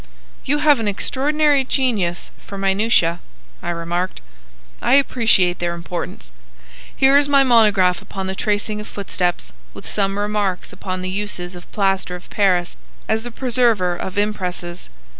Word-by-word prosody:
"You 290 +3 +2
have 295 -3 +4
an 225 - -2
extraordinary 285 +6 +2
genius 220 -11 0 0.2
for 200 - -7
minutiæ," 195 -3 +2 0.4
I - - -4
remarked. 175 +2 -2 0.6
"I - - +4
appreciate 225 -10 +3
their 175 0 -1
importance. 170 - -6 0.6
Here 270 +1 +5
is 285 0 0
my 280 -1 +5
monograph 210 -7 +4
upon 195 -1 -6
the 190 - -2
tracing 210 +1 -1
of 210 - -9
footsteps, 180 - -2 0.2
with - - -10
some 195 -1 0
remarks 205 -3 -1
upon 185 -1 -5
the 185 - -3
uses 190 -3 -4
of 175 0 -12
plaster 195 -3 0
of 180 - -12
Paris 180 -4 +1 0.3
as 220 +2 0
a - - -7
preserver 230 -8 +1
of 185 +2 -6
impresses. 180 -4 -3
200 Hz, 145 wpm, -20 LUFS, 180-230 Hz, 0.6 s, Here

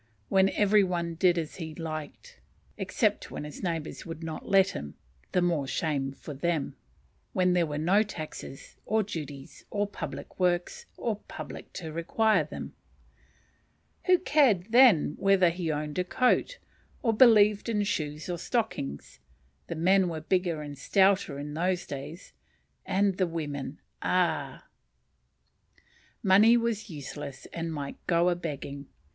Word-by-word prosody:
When 190 0 +4
every 205 0 +4
one 170 -2 -1
did 175 +1 +3
as 160 -2 -3
he 160 -3 -6
liked, 155 -3 -7 0.4
except - - 0
when - - -6
his 150 0 -8
neighbours 165 -4 -3
would 165 0 -8
not 160 -1 -6
let 195 -1 +5
him, 70 0 -7 0.4
(the 180 - +2
more 165 -6 +1
shame 135 -1 -1
for 145 +2 -9
them,) 155 +1 -1 0.6
when 180 -1 +3
there 175 -2 +2
were 145 -1 -4
no 180 +7 +3
taxes, 155 -8 -7
or 220 +1 +2
duties, 145 -8 -7
or 205 0 0
public 205 - -7
works, 175 -1 0
or 225 -3 -2
public - - -8
to 160 -4 -6
require 215 +7 +2
them. - - -8 1.3
Who 365 0 +6
cared 245 - +3
then 230 - +6
whether 195 -3 +4
he 170 -2 -2
owned 150 +2 -3
a - - +2
coat? 255 - +1 0.5
or 230 -3 +3
believed 210 -2 +5
in 210 -2 +1
shoes 155 -6 -3
or 175 -2 -3
stockings? 170 - -3 0.5
The - - -4
men 185 +3 +3
were 160 -2 -4
bigger 175 -2 0
and 145 -1 -7
stouter 190 +1 +2
in 145 +1 -6
those 180 +2 0
days; 145 +5 -8 0.5
and 195 -1 +2
the 185 - +2
women, 150 -4 -5 0.2
ah! - - 0 1.6
Money 210 +5 +6
was 230 -2 -2
useless 145 -3 -7
and 165 -1 -3
might 145 -3 -5
go 170 +1 +3
a 175 - +1
begging. 140 -4 -6
175 Hz, 145 wpm, -28 LUFS, 150-195 Hz, 1.6 s, Who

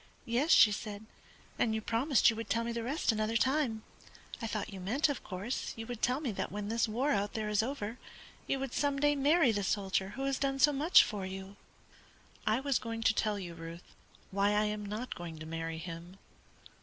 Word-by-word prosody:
"Yes," 245 +7 0
she 215 - +8
said, 210 0 -5 0.5
"and 220 -2 +2
you - - 0
promised 235 +3 +3
you - - -5
would 225 -2 -6
tell 230 +3 +1
me 235 - -2
the 235 0 -3
rest 265 +3 0
another 220 +1 0
time. 260 -3 +1 0.6
I 225 - -2
thought 215 -2 -4
you 195 - -7
meant, 260 +12 +1
of 285 - -3
course, 200 +6 -4
you 225 - -5
would 240 -1 -6
tell 250 +3 +2
me 265 -7 -1
that 200 - -4
when 205 0 -4
this 230 +1 +1
war 250 +7 0
out 205 -5 0
there 215 -1 -2
is 210 0 +3
over, 230 -2 -4 0.5
you 275 - +1
would 270 -2 -4
some 285 -1 +1
day 290 +1 +3
marry 290 0 +4
the 205 -2 -1
soldier 195 -1 -1
who 270 - -3
has 275 -1 0
done 270 0 0
so 290 +2 +5
much 300 +6 +6
for 205 -3 -4
you." 190 +1 -7 0.9
"I 215 +3 +3
was 275 -2 +1
going 230 0 -4
to 225 - +4
tell 210 -1 0
you, 175 -3 -6
Ruth, 165 +1 -10 0.4
why 200 +1 +2
I 210 +1 +3
am 210 0 -2
not 215 +5 -4
going 170 -2 -7
to 155 - -8
marry 165 0 -4
him." 170 +2 -8
220 Hz, 215 wpm, -32 LUFS, 200-265 Hz, 0.9 s, she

